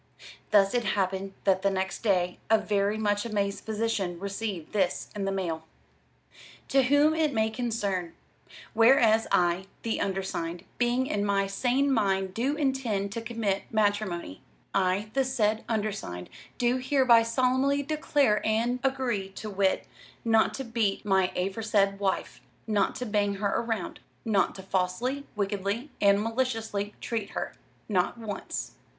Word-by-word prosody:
Thus 195 -1 +4
it 245 -1 +1
happened 195 -1 -1
that 190 -1 +3
the 200 - +3
next 190 0 -2
day 180 -5 +1
a 220 - +6
very 205 0 0
much 205 -1 +1
amazed 200 -3 -2
physician 215 -5 -2
received 200 -3 -4
this 190 -4 0
in 200 -1 -2
his - - 0
mail: 165 -4 -3 1.0
"To 270 - +5
whom 285 +4 +4
it 310 -4 +1
may 220 0 +2
concern: 205 -7 -2 0.6
"Whereas, 225 -1 +5
I, 175 +2 +2 0.2
the 225 - -1
Undersigned, 185 -3 -3 0.2
being 245 +1 +2
in 205 -8 -1
my 200 -1 +2
sane 250 +8 +1
Mind 195 -4 +1
do 260 +7 0
intend 260 -9 -1
to 230 +2 -4
commit 225 -4 -2
Matremony, 205 - 0 0.3
I, 195 +2 +1
the 270 - +3
said 220 -4 0
Undersigned 210 - -3 0.3
do 245 0 +2
hereby 255 -3 +5
solumly 260 +4 +1
declare 285 -7 +2
and 230 +3 +1
agree, 255 -8 0
to 215 +2 -6
wit, 195 -1 +1 0.4
not 225 -1 +3
to 270 - -4
Beat 225 -4 -1
my 190 -2 +3
aforesaid 195 +1 +1
Wife. 195 -2 -2 0.2
Not 205 -3 +1
to 250 - -4
Bang 205 -2 +1
her 200 +2 0
round. 225 -5 -3 0.3
Not 205 -4 +2
to 190 - -9
Falsely, 195 +9 -1
Wickedly 205 +6 -2
and 200 0 +4
Maliciously 225 -4 -2
treat 220 -4 -3
her. - - -3 0.3
Not 190 +2 +1
once. 215 -4 -5
210 Hz, 145 wpm, -28 LUFS, 195-235 Hz, 1.0 s, a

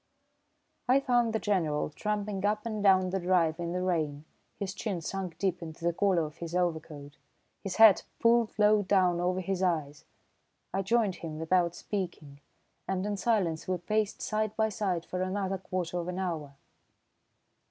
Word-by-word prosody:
I 260 +2 +6
found 245 -4 +2
the 220 - 0
General 165 -9 0
tramping 210 +1 -3
up 210 +1 0
and 215 -2 -3
down 190 -2 +4
the 190 - 0
drive 175 -3 +2
in 170 0 -3
the 180 +1 -2
rain, 155 -5 -1 0.3
his 195 -2 -4
chin 205 -3 -3
sunk 185 +1 -5
deep 185 -2 -1
into 165 0 -7
the 170 - +2
collar 185 -2 +2
of 150 +2 -10
his 170 0 -6
overcoat, 160 -5 -2 0.5
his 195 -2 -3
hat 220 -3 +7 0.2
pulled 230 -1 +3
low 210 0 +5
down 185 -3 +2
over 180 +1 0
his 190 0 -2
eyes. 155 -6 -1 0.7
I 195 - +1
joined 200 -2 +1
him 160 -2 -6
without 170 +1 +1
speaking, 170 -9 -5 0.5
and 190 0 -1
in 205 0 -1
silence 195 -7 0
we 185 0 0
paced 210 +4 -1
side 215 -1 -1
by 220 0 +2
side 185 -5 -2
for 180 - -4
another 190 0 -1
quarter 180 -1 -3
of 170 - -4
an 180 0 -4
hour. 160 -7 -3
185 Hz, 170 wpm, -30 LUFS, 170-205 Hz, 0.7 s, hat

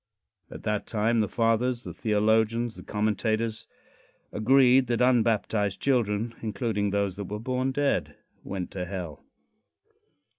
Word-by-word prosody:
At - - -10
that 105 -1 -2
time 115 +1 +1
the 105 - +2
fathers 120 +2 +1
the - - -7
theologians, 110 +2 +1
the - - -10
commentators 110 +1 -1 0.6
agreed 130 +3 +4
that 120 -1 0
unbaptized 110 -5 +2
children, 115 -4 0
including 110 -2 -1
those 100 -1 -1
that 100 - -4
were 105 +3 -5
born 130 +3 -1
dead, 125 - 0 0.3
went 95 -2 -5
to 90 -2 -4
hell. 85 -5 -6
110 Hz, 125 wpm, -27 LUFS, 105-120 Hz, 0.6 s, agreed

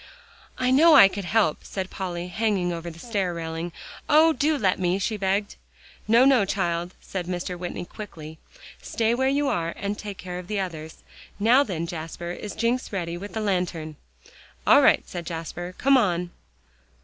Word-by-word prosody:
"I 255 0 +1
know 310 +4 +7
I 200 - +10
could 195 0 -5
help," 195 -5 +2
said 190 -1 -5
Polly, 180 -2 -4
hanging 190 -3 0
over 170 0 -5
the 165 - -12
stair 195 -3 -2
railing. 165 +1 -4 0.4
"Oh! 315 +2 +6
do 305 0 +1
let 190 -8 +1
me," 180 0 +1
she 205 +3 -1
begged. 200 +1 -1 0.5
"No, 235 +4 +6
no, 265 -5 +5
child," 175 -3 -2
said 180 -3 -5
Mr. 180 0 -3
Whitney, 175 0 -5
quickly. 160 -6 -10 0.4
"Stay 230 0 0
where 265 +2 +1
you 285 +1 +1
are, 170 -8 -1
and 205 +1 -3
take 205 -2 -7
care 180 -1 -6
of 180 - -10
the 210 0 -2
others. 160 -4 -6 0.3
Now, 230 +6 +5
then, 180 - -2
Jasper, 170 +1 -6
is 205 +3 -7
Jencks 235 +3 -1
ready 170 -4 -3
with 200 +4 -8
the 220 - -2
lantern?" 180 -6 -2 0.7
"All - - +7
right," - - +4
said 170 -2 -6
Jasper. 175 +2 -6
"Come 275 0 +4
on." 180 -6 0
185 Hz, 175 wpm, -25 LUFS, 175-220 Hz, 0.7 s, I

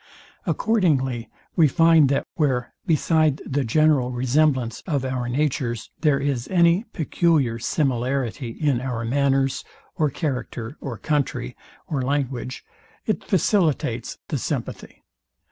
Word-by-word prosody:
Accordingly 135 - +1 0.3
we 160 -3 +6
find, 165 -1 +5
that 140 - +1
where, 130 -6 0
beside 155 -2 +2
the 140 0 -1
general 135 0 +3
resemblance 130 -1 +1
of 140 -6 0
our 125 -2 -2
natures, 125 -4 -1
there 150 -4 +3
is 135 -3 -1
any 175 +3 +3
peculiar 155 -7 +1
similarity 130 -1 -1
in 135 0 0
our 125 -3 -3
manners, 135 +1 +1 0.3
or 155 -2 +2
character, 125 -4 -4
or 125 -6 -5
country, 145 - -1 0.3
or 140 -3 -2
language, 130 -2 -2 0.4
it - - -1
facilitates 170 - +1
the - - -1
sympathy. - - -5
135 Hz, 115 wpm, -23 LUFS, 125-155 Hz, 0.4 s, we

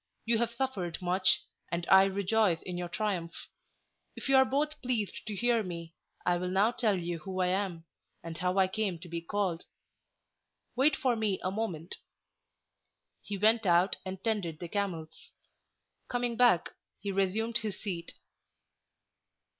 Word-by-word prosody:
You 230 0 +3
have 235 0 +1
suffered 235 -9 -2
much, 185 +1 +3 0.3
and 170 0 -1
I 190 0 +8
rejoice 195 -2 +1
in 180 - -5
your 175 0 -3
triumph. 180 -4 -2 0.8
If - - -6
you 270 - +5
are 265 0 +7
both 295 +3 -1
pleased 240 -6 -2
to 210 - -3
hear 240 +2 +2
me, 170 -4 -6 0.3
I 175 0 +3
will 180 +1 -2
now 195 +5 +3
tell 220 -5 +1
you 170 -1 -3
who 185 +4 -5
I 180 -1 +3
am, 185 -3 -1 0.4
and 165 -1 -6
how 180 +3 -1
I 190 -1 +5
came 190 -2 -1
to 175 +2 -11
be 170 0 -4
called. 180 -1 -1 1.1
Wait 275 +3 +4
for 255 -3 +1
me 215 -4 0
a 185 - 0
moment." 185 -6 -4 1.2
He 205 - -5
went 220 +1 +3
out 175 +2 +4
and 190 0 -6
tended 200 -8 -1
the 175 - -6
camels; 170 -5 -4 0.8
coming 245 -1 -1
back, 240 -8 +4 0.3
he 200 0 -3
resumed 200 +4 +1
his 215 -2 -5
seat. 175 -5 -5
195 Hz, 155 wpm, -31 LUFS, 175-225 Hz, 1.2 s, I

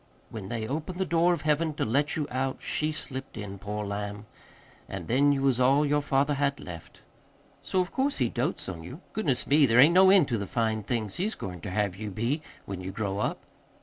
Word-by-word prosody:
When 105 -4 -6
they 115 -1 -3
opened 155 +7 -4
the 190 - 0
door 170 +1 +3
of 170 -4 -1
Heaven 155 0 +1
to - - -1
let 140 +6 +1
you 150 -3 -1
out 130 +1 -1
she 155 +1 -1
slipped 135 -5 -6
in, 100 -2 -6
poor 105 +1 -4
lamb. 100 +1 -4 0.6
An' - - -5
then 140 +4 +3
you 135 -1 0
was 130 -2 +2
all 135 +4 +4
your 145 0 +2
father 140 +1 +1
had 140 -1 0
left. 85 -3 -10 0.6
So 185 - 0
of 180 - -4
course 275 +2 0
he 125 - +2
dotes 125 +9 -2
on 90 -4 -5
you. 130 - -9
Goodness 145 - 0
me, 145 0 +5
there 115 +1 +4
ain't 150 +6 +8
no 190 +1 +7
end 190 -7 +6
to 115 -3 0
the 100 - -4
fine 110 -1 0
things 110 -1 -3
he's 210 +5 -1
goin' 90 -3 -7
ter 100 - -5
have 100 -1 0
you 105 +2 -5
be 115 - -1 0.2
when 95 -2 -5
you 90 - -5
grow 100 -1 -2
up." - - -2
130 Hz, 225 wpm, -28 LUFS, 105-150 Hz, 0.6 s, ain't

